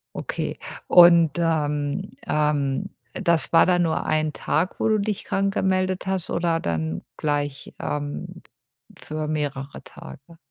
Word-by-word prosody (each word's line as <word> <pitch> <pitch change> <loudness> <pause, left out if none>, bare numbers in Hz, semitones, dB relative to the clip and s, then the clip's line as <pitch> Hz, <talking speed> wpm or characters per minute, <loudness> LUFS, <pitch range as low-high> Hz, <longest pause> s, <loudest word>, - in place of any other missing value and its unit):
Okay. - - -4 0.3
Und, 170 -3 +7
ähm, 150 +2 -1 0.2
ähm, 145 -3 0 0.2
das 170 -2 +1
war - - +7
dann 175 -1 +3
nur 160 - -1
1 155 -1 0
Tag, 175 +4 -1
wo - - +1
du 215 -1 +3
dich 205 0 -2
krank 195 0 0
gemeldet 185 0 0
hast, 190 -3 -2
oder 170 -1 0
dann 80 - -2 0.2
gleich, 145 -2 -2
ähm, 150 +5 -5 0.6
für 155 0 -5
mehrere 145 -2 -3
Tage? 165 +5 -13
160 Hz, 130 wpm, -24 LUFS, 145-180 Hz, 0.6 s, Und